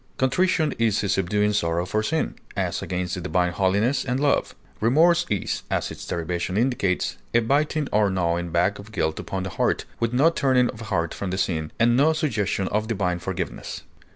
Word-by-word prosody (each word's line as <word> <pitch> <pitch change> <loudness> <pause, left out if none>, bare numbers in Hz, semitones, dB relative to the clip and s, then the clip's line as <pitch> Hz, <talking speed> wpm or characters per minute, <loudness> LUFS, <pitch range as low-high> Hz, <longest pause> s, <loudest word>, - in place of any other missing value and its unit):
Contrition 155 +3 +2
is 110 -3 +2
a 100 - -1
subduing 105 +2 +1
sorrow 85 -3 0
for 110 +3 0
sin, 160 +8 -1 0.2
as - - -1
against 90 -1 -3
the 90 - -3
divine 90 0 +1
holiness 100 +8 +1
and 125 0 -1
love. 145 0 +1 0.2
Remorse 170 +9 +4
is, 100 - -1
as - - -1
its - - -9
derivation 85 +3 -2
indicates, 110 -6 0 0.2
a - - +7
biting 145 +5 +1
or 105 -1 +3
gnawing 85 -2 0
back 95 +5 +1
of 100 +2 -11
guilt 80 -7 -1
upon 95 -1 -4
the 95 - -3
heart, - - 0
with 115 -1 0
no 140 +7 +4
turning 130 -5 +2
of 110 - -12
heart 85 -6 -1
from 100 - -4
the 95 - -2
sin, 80 -5 -1
and 120 +1 +4
no 150 +5 +4
suggestion 105 -11 -1
of 105 +1 -1
divine 95 -6 -1
forgiveness. 90 -1 -5
105 Hz, 185 wpm, -24 LUFS, 90-125 Hz, 0.2 s, a